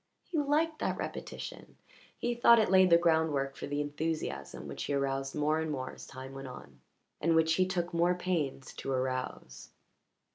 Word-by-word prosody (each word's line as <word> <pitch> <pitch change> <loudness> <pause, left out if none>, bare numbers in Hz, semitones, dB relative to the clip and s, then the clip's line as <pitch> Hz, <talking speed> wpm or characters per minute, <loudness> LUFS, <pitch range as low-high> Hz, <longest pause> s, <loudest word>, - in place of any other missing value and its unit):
He 325 - -2
liked 305 +2 +1
that - - -1
repetition; - - -7 0.4
he 240 - -1
thought 235 0 +6
it 215 -4 +3
laid 190 -1 +6
the 170 - +8
groundwork 160 -5 +2
for - - -6
the 145 +1 -1
enthusiasm 155 +2 -3
which - - -5
he 140 - -1
aroused 135 0 -1
more 150 +1 +2
and 160 0 -2
more 130 -3 -3
as - - -11
time 130 0 -9
went 135 0 -7
on, 70 - -11 0.4
and 165 +1 +3
which 160 0 +4
he 185 +2 +3
took 175 -2 -2
more 175 +1 +3
pains 160 -8 -2
to 135 - -4
arouse. 130 - -3
160 Hz, 180 wpm, -31 LUFS, 135-180 Hz, 0.4 s, the